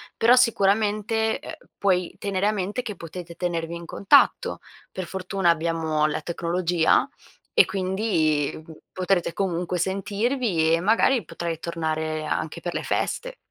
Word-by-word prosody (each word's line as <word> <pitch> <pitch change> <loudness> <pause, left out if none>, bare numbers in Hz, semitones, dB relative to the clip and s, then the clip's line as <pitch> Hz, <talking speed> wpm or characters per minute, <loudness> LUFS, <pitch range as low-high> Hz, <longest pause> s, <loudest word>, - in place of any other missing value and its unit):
però 235 +2 +5
sicuramente, 220 -1 +2
ehm, - - -8 0.2
puoi 180 -3 +1
tenere 200 0 0
a - - +3
mente 205 +4 -3
che 215 -4 -5
potete 170 0 -9
tenervi 170 -1 -3
in 170 0 -8
contatto, 285 - +3 0.3
per 185 - -5
fortuna 190 0 -1
abbiamo 160 -2 +1
la 155 - -2
tecnologia, 170 -1 +1 0.5
e 455 - +7
quindi 185 -7 0 0.3
potrete 185 -2 0
comunque 180 -2 -1
sentirvi, 195 -1 0
e 165 - +3
magari 225 +6 +3
potrai 165 -1 -4
tornare 160 -2 -2
anche - - -3
per - - -4
le - - -3
feste. - - -2
185 Hz, 135 wpm, -24 LUFS, 165-210 Hz, 0.5 s, e